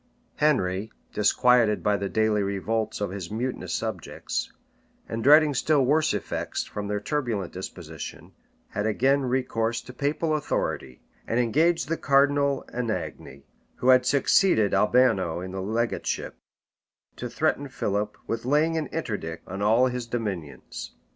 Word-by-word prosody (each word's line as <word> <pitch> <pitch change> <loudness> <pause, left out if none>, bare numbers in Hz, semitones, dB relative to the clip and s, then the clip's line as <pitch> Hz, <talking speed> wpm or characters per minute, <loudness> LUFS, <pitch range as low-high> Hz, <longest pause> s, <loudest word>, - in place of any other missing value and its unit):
Henry, 110 -8 +1 0.2
disquieted 115 +1 +3
by 105 - +3
the 100 -1 -2
daily 110 -1 +2
revolts 105 +3 -2
of 100 - -1
his 95 -4 -6
mutinous 120 +4 -3
subjects, - - -4 0.6
and 115 0 -4
dreading 150 +2 +6
still 140 +1 +2
worse 155 +4 +3
effects - - -3
from 105 -1 -5
their 105 0 -1
turbulent 110 - -2
disposition, 85 -4 -8 0.4
had 105 - -2
again 135 +6 +2
recourse 120 -3 0
to 125 - -11
papal 150 +4 -1
authority; 65 - -3 0.2
and 115 - +1
engaged 160 +8 +2
the 165 +2 -1
cardinal 140 0 +2
Anagni, 110 - -4 0.3
who 125 - 0
had 130 0 +6
succeeded 135 - +3
Albano 100 -5 +3
in 90 +1 -6
the 95 0 -4
legateship, 115 +4 -2 0.8
to 125 - -5
threaten 145 +2 0
Philip 105 -4 -2
with 115 0 -3
laying 150 +5 +2
an 155 - -3
interdict 100 - -5
on 95 +2 -5
all 110 +5 +4
his 125 -2 -2
dominions. 95 - -5
115 Hz, 135 wpm, -26 LUFS, 100-140 Hz, 0.8 s, dreading